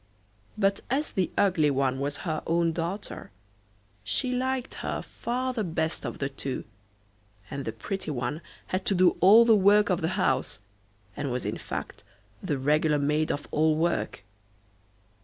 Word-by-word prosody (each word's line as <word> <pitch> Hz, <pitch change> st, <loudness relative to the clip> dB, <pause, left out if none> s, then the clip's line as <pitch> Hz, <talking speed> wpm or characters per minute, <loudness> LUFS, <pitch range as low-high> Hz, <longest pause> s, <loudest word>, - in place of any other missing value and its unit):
But 195 Hz, -1 st, +2 dB
as 280 Hz, +4 st, 0 dB
the 185 Hz, -2 st, 0 dB
ugly 175 Hz, -7 st, +3 dB
one 135 Hz, -1 st, +1 dB
was 145 Hz, +1 st, -2 dB
her 155 Hz, -3 st, -1 dB
own 170 Hz, 0 st, +2 dB
daughter, 175 Hz, +5 st, -4 dB, 0.7 s
she 105 Hz, -, -1 dB
liked 260 Hz, 0 st, -1 dB
her -, -, -3 dB
far 255 Hz, +2 st, -3 dB
the 225 Hz, -4 st, -1 dB
best 160 Hz, -2 st, -2 dB
of -, -, -5 dB
the 140 Hz, -, -1 dB
two, 135 Hz, -1 st, -5 dB, 0.9 s
and 140 Hz, -1 st, -4 dB
the -, -, -2 dB
pretty 195 Hz, -5 st, -5 dB
one 130 Hz, +3 st, -3 dB, 0.3 s
had 185 Hz, +1 st, 0 dB
to 195 Hz, -, +3 dB
do 180 Hz, -1 st, +4 dB
all 215 Hz, +6 st, +8 dB
the 225 Hz, -1 st, +6 dB
work 205 Hz, +1 st, +5 dB
of 180 Hz, -, +1 dB
the 160 Hz, -, +1 dB
house, -, -, +1 dB, 0.6 s
and 140 Hz, -, -3 dB
was 125 Hz, +1 st, -2 dB
in -, -, -3 dB
fact -, -, -6 dB, 0.4 s
the 155 Hz, -7 st, -1 dB
regular 150 Hz, +3 st, +2 dB
maid 150 Hz, +2 st, +1 dB
of 145 Hz, -, -4 dB
all 155 Hz, 0 st, +3 dB
work. 165 Hz, -9 st, -1 dB
165 Hz, 160 wpm, -27 LUFS, 145-200 Hz, 0.9 s, all